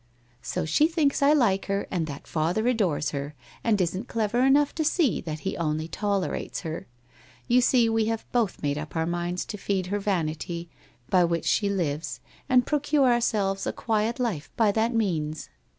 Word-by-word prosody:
' 120 - -35
So - - -3
she 230 - +3
thinks 315 -5 +1
I 280 +1 +5
like 215 -10 +2
her 200 0 -1
and 170 -4 -1
that 140 -2 -7
father 170 +8 0
adores 180 -11 +1
her, 145 +1 -5 0.3
and 220 -3 +2
isn't 185 +6 -1
clever 225 +1 0
enough 275 +3 +4
to 315 - -1
see 310 - +2
that 155 -2 -5
he 195 - -3
only 155 -1 -1
tolerates 200 +1 -2
her. 160 -2 -5 0.6
You 250 +1 +4
see, 245 -1 +4
we 225 -1 +1
have 225 0 -2
both 230 -6 0
made 145 0 0
up 150 +2 -8
our 160 0 +1
minds 175 +1 -2
to 210 - -7
feed 190 -2 -1
her 205 - +1
vanity 170 -3 -2 0.4
by 185 -2 +5
which 170 -1 0
she 205 -2 +2
lives, 160 -5 -2 0.3
and 255 -1 +5
procure 290 -3 +2
ourselves 205 -5 0
a - - +1
quiet 225 +2 -1
life 175 -13 -2
by 220 -3 +4
that 225 +3 +1
means. 160 -8 -1
200 Hz, 185 wpm, -26 LUFS, 165-235 Hz, 0.6 s, I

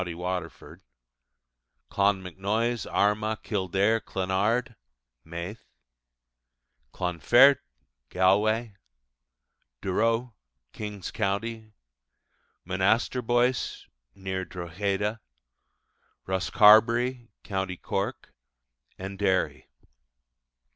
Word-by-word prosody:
Waterford), 90 -1 -6 1.1
Clonmacnoise, 100 +4 0
Armagh, 105 +1 0
Kildare, 100 +2 +1
Clonard 105 +7 -1 0.5
(Meath), 85 +6 -7 1.3
Clonfert 120 - +4 0.5
(Galway), 105 +5 +2 1.1
Durrow 115 - 0 0.4
(King's 105 -3 -6
Co.), 100 +1 0 1.3
Monasterboice 120 +6 +1 0.3
(near 95 -1 -4
Drogheda), 95 +5 -3 1.1
Rosscarbery 110 +6 +4
(Co. 95 -2 -2 0.2
Cork), - - -3 0.6
and 95 +1 -7
Derry. 95 -2 0
100 Hz, 55 wpm, -27 LUFS, 95-115 Hz, 1.3 s, Clonfert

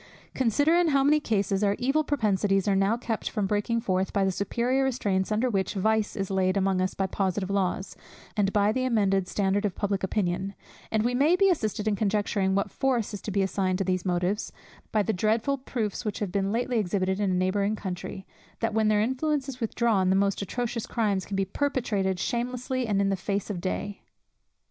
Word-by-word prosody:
Consider 265 +6 +2
in 350 0 +4
how 275 -3 +3
many 300 +2 +4
cases 200 -5 0
our 200 0 +2
evil 270 +5 +1
propensities 205 -8 +1
are 200 - +3
now 195 +4 +2
kept 230 -2 -3
from 210 -3 -1
breaking 210 +3 0
forth, 190 -4 0
by 195 -1 +1
the 190 - +2
superior 235 +8 0
restraints 205 -7 0
under 220 +4 +2
which 195 -4 -1
vice 220 +2 +1
is 195 -2 -3
laid 190 0 +1
among 190 -1 +1
us 185 - -1
by 195 - 0
positive 190 0 -1
laws, 195 -1 -1 0.4
and 200 -2 +2
by 205 0 +3
the 255 +3 -1
amended 200 -6 +2
standard 200 +1 0
of 200 -4 -1
public 200 -1 -1
opinion; 190 0 -1 0.3
and 220 -1 +1
we 240 +2 +1
may 290 +7 +4
be 390 +1 +4
assisted 220 - -1
in 210 - +2
conjecturing 200 -2 0
what 200 0 0
force 245 -5 0
is 205 - -5
to - - -5
be 200 -1 +1
assigned 190 -1 0
to 195 - 0
these 185 -1 -1
motives, 180 +3 -1 0.4
by 215 -1 +2
the 220 - 0
dreadful 225 +8 +1
proofs 230 -6 -3
which 210 -3 -3
have 205 -4 -3
been 195 0 0
lately 240 +1 0
exhibited 190 -1 0
in 205 -2 +1
a - - +1
neighbouring 200 +3 +1
country, 190 -1 -6 0.3
that 225 -1 -1
when 220 0 +2
their 210 -1 +3
influence 265 +4 0
is 260 -2 -7
withdrawn, 220 -4 +1
the 190 - +3
most 200 0 +1
atrocious 235 +3 -3
crimes 205 -5 0
can 200 - -4
be 195 0 +1
perpetrated 205 -6 -1
shamelessly 250 +2 -2
and 205 -2 +1
in 195 - +2
the 195 - +1
face 200 +2 -2
of 180 -4 -4
day. 200 +2 -3
205 Hz, 205 wpm, -27 LUFS, 195-235 Hz, 0.4 s, in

